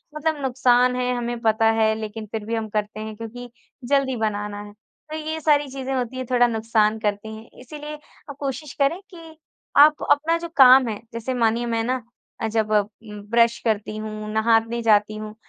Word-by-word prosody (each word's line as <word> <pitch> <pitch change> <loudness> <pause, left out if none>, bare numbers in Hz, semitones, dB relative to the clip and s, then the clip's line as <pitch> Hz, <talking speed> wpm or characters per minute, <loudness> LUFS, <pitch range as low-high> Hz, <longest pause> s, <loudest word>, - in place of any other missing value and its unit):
मतलब 305 -1 -1
नुकसान 250 -1 +3
है 250 0 -1
हमें 240 0 -3
पता 225 -1 +2
है 220 0 +3
लेकिन 215 0 -6
फिर 220 -2 -4
भी 230 +1 -2
हम 220 -1 -3
करते 210 0 -3
हैं 215 0 -6
क्योंकि 240 +2 -8 0.4
जल्दी 275 -2 +2
बनाना 205 -1 -3
है। 205 0 -12
तो 300 +8 -14
ये 315 +1 -4
सारी 290 -2 +3
चीज़ें 270 0 -4
होती 255 0 -3
हैं 255 - -4
थोड़ा 245 -1 +4
नुकसान 220 -1 +1
करती 215 0 -3
हैं 220 +1 -13
इसीलिए 300 +3 -8 0.3
आप 280 - -7
कोशिश 280 +1 -5
करें 330 +7 +2
कि 325 -2 -12 0.4
आप 300 +1 +6
अपना 320 +3 +3
जो 340 0 -7
काम 260 -1 +8
है, 210 -2 -4
जैसे 230 +3 -3
मानिए 235 0 +1
मैं 230 -1 -1
ना 255 +1 -1 0.4
अ, 225 - 0
जब 220 -1 -1
उम, 210 0 -2
ब्रश 235 0 +4
करती 215 -1 -1
हूँ 215 0 -6
नहाने 225 +1 +2
जाती 215 -1 +3
हूँ 215 0 -7
230 Hz, 190 wpm, -23 LUFS, 215-265 Hz, 0.4 s, काम